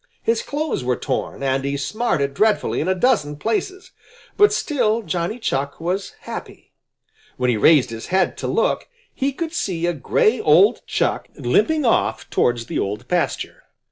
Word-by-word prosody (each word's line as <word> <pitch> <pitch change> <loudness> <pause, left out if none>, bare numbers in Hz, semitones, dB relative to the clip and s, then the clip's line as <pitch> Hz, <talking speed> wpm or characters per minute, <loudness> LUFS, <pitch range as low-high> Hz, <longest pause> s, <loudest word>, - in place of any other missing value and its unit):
His 230 0 +1
clothes 295 - -3
were 125 0 +1
torn, 135 +1 -3
and 135 0 0
he 140 +1 -1
smarted 145 - -1
dreadfully 215 +6 +1
in 160 - -2
a 185 - +2
dozen 185 - +1
places. 370 - -3 0.4
But 415 0 +5
still 230 -6 0
Johnny 175 +4 -2
Chuck 140 - -2
was 180 +4 -3
happy. - - -9 0.7
When 125 -1 +1
he - - +1
raised 130 +1 +5
his 115 0 -7
head 190 +1 +1
to - - -3
look, - - 0 0.3
he 275 +1 -1
could 320 +4 -5
see 185 - -2
a 175 - +1
gray 435 - +1
old 405 - +5
Chuck - - -1
limping 315 -3 +1
off 230 - +1
towards 120 -1 +1
the - - -3
Old 105 +5 -3
Pasture. 175 -1 -2
180 Hz, 165 wpm, -21 LUFS, -, 0.7 s, But